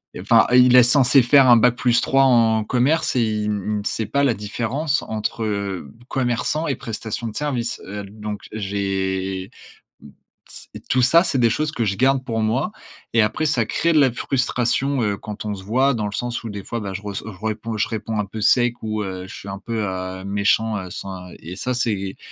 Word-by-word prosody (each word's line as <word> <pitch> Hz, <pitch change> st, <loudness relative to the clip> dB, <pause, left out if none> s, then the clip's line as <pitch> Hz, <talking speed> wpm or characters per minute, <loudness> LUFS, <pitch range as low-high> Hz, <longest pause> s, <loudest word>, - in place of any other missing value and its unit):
heu, -, -, -6 dB
enfin, -, -, +5 dB
il 125 Hz, 0 st, +6 dB
est 125 Hz, -, +9 dB
censé 130 Hz, +1 st, +5 dB
faire 135 Hz, +2 st, +6 dB
un 120 Hz, -, +8 dB
bac+3 125 Hz, +2 st, +2 dB
en 115 Hz, -4 st, +4 dB
commerce 130 Hz, +9 st, +1 dB
et 125 Hz, -, +3 dB
il 110 Hz, -2 st, 0 dB
il 105 Hz, 0 st, -2 dB
ne -, -, -4 dB
sait 110 Hz, +1 st, -2 dB
pas 140 Hz, +6 st, +1 dB
la 130 Hz, -5 st, +2 dB
différence 120 Hz, +8 st, -2 dB
entre, 110 Hz, +1 st, -3 dB
heu, 100 Hz, -8 st, -3 dB, 0.2 s
commerçant 130 Hz, +5 st, -1 dB
et 140 Hz, -, 0 dB
prestation 115 Hz, -2 st, -5 dB
de 110 Hz, -, -7 dB
service. 130 Hz, -6 st, -2 dB
Heu, 105 Hz, +2 st, -6 dB
l 100 Hz, +2 st, -12 dB
donc 105 Hz, -1 st, -5 dB
j'ai 95 Hz, -2 st, -2 dB, 0.6 s
m -, -, -13 dB, 0.4 s
s -, -, -10 dB
et -, -, -8 dB
tout 130 Hz, -, 0 dB
ça, 165 Hz, +8 st, +5 dB
c'est 170 Hz, -6 st, 0 dB
des 120 Hz, -2 st, +4 dB
choses 155 Hz, +4 st, -1 dB
que 120 Hz, -, -1 dB
je 100 Hz, -2 st, -1 dB
garde 130 Hz, +3 st, +2 dB
pour 115 Hz, -4 st, -2 dB
moi 125 Hz, -, 0 dB, 0.4 s
et 115 Hz, -, +4 dB
après, 105 Hz, +9 st, 0 dB
ça 120 Hz, -7 st, +1 dB
crée 170 Hz, +8 st, +1 dB
de 155 Hz, -, +5 dB
la 135 Hz, -2 st, +4 dB
frustration, 130 Hz, +1 st, 0 dB
heu, 105 Hz, -2 st, 0 dB
quand 105 Hz, 0 st, -7 dB
on 105 Hz, -1 st, -2 dB
se 95 Hz, -, -9 dB
voit 130 Hz, +7 st, +2 dB
dans 110 Hz, -3 st, -2 dB
le 100 Hz, -, -5 dB
sens 120 Hz, +2 st, -3 dB
où, -, -, -4 dB
des 100 Hz, -1 st, -7 dB
fois, 115 Hz, -, -4 dB
bah, 100 Hz, -2 st, -5 dB
je 100 Hz, -, -6 dB
reç 100 Hz, -2 st, -5 dB
je 105 Hz, -2 st, -10 dB
réponds 110 Hz, +1 st, -3 dB
je 105 Hz, -, +1 dB
réponds 110 Hz, -1 st, -4 dB
un 105 Hz, -, 0 dB
peu 110 Hz, +3 st, -7 dB
sec 120 Hz, +3 st, +2 dB
ou, 110 Hz, -1 st, -2 dB
heu, 95 Hz, -2 st, -6 dB
je -, -, -10 dB
suis 100 Hz, -, -9 dB
un 95 Hz, -, -6 dB
peu, 115 Hz, +2 st, -3 dB
heu, 95 Hz, 0 st, -5 dB
méchant, 105 Hz, +2 st, +1 dB
heu, 90 Hz, -2 st, -7 dB
sans, 90 Hz, 0 st, -7 dB
heu -, -, -12 dB
et 85 Hz, +3 st, -8 dB
ça, 125 Hz, +6 st, -2 dB
c'est, 100 Hz, -6 st, -2 dB
110 Hz, 225 wpm, -21 LUFS, 100-125 Hz, 0.6 s, est